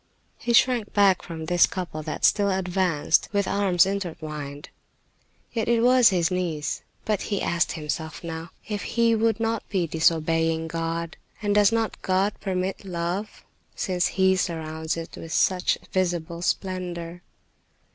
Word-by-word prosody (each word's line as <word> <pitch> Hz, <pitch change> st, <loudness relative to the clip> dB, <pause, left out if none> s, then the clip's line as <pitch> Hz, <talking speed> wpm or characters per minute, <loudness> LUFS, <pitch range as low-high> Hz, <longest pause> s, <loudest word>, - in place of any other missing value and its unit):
He 240 Hz, -, -1 dB
shrank 235 Hz, -3 st, +3 dB
back 200 Hz, -3 st, +4 dB
from 160 Hz, -2 st, -7 dB
this 175 Hz, +1 st, +4 dB
couple 175 Hz, -4 st, -5 dB
that 155 Hz, 0 st, -2 dB
still 205 Hz, -1 st, +4 dB
advanced 185 Hz, -4 st, +1 dB
with 200 Hz, -1 st, +1 dB
arms 190 Hz, -4 st, +3 dB
intertwined. 155 Hz, -7 st, -5 dB, 0.8 s
Yet 225 Hz, -2 st, -1 dB
it 235 Hz, -1 st, +3 dB
was 250 Hz, -1 st, +6 dB
his 175 Hz, -3 st, +1 dB
niece. 170 Hz, -5 st, -2 dB, 0.2 s
But 210 Hz, -3 st, 0 dB
he 200 Hz, -2 st, 0 dB
asked 170 Hz, 0 st, 0 dB
himself 160 Hz, +1 st, -4 dB
now 165 Hz, 0 st, -6 dB, 0.2 s
if 205 Hz, -1 st, -3 dB
he 230 Hz, -1 st, +2 dB
would 225 Hz, 0 st, +1 dB
not 225 Hz, -1 st, -2 dB
be 185 Hz, -4 st, +1 dB
disobeying 165 Hz, 0 st, +1 dB
God. 165 Hz, +1 st, -3 dB, 0.2 s
And 205 Hz, -2 st, 0 dB
does 205 Hz, 0 st, +5 dB
not 225 Hz, -1 st, -1 dB
God 190 Hz, +2 st, +1 dB
permit 190 Hz, 0 st, -2 dB
love, 180 Hz, +2 st, -4 dB, 0.3 s
since 180 Hz, -2 st, 0 dB
He 190 Hz, 0 st, +4 dB
surrounds 160 Hz, -3 st, -2 dB
it 165 Hz, 0 st, -7 dB
with 165 Hz, 0 st, -7 dB
such 180 Hz, +1 st, +2 dB, 0.2 s
visible 175 Hz, -2 st, -1 dB
splendor? 175 Hz, -2 st, -3 dB
180 Hz, 145 wpm, -25 LUFS, 165-200 Hz, 0.8 s, was